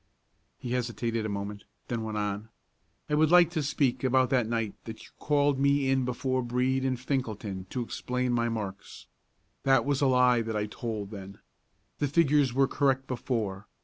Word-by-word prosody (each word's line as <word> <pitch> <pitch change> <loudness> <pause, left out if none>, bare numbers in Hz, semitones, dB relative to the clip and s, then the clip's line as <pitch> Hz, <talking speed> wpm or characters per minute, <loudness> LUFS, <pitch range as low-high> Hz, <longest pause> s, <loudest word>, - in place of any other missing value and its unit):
He 120 - -6
hesitated 115 -2 -1
a - - -4
moment, 100 0 -5 0.2
then 120 -2 -2
went 110 -1 -4
on: 105 +1 -3 0.6
"I - - -3
would 155 +1 +4
like 175 -1 +6
to 165 -3 -1
speak 140 -3 0
about 130 -1 +3
that 125 -4 +2
night 115 -3 -1
that 115 - -7
you - - -14
called 145 -2 +2
me 140 -1 +3
in 135 -1 +2
before 130 +1 -1
Brede 125 +2 0
and 130 -1 0
Finkelton 110 -8 -3
to 125 - -2
explain 125 +1 -2
my 120 0 +1
marks. 100 -4 -6 0.6
That 135 -3 +3
was 140 -1 0
a 140 - +4
lie 125 -2 +4
that 110 -1 -3
I 105 - 0
told 105 -2 -5
then. 100 -1 -9 0.6
The 145 - +1
figures 145 -3 +3
were 135 +2 +3
correct 135 -2 +1
before. 110 -6 -3
125 Hz, 180 wpm, -28 LUFS, 110-135 Hz, 0.6 s, like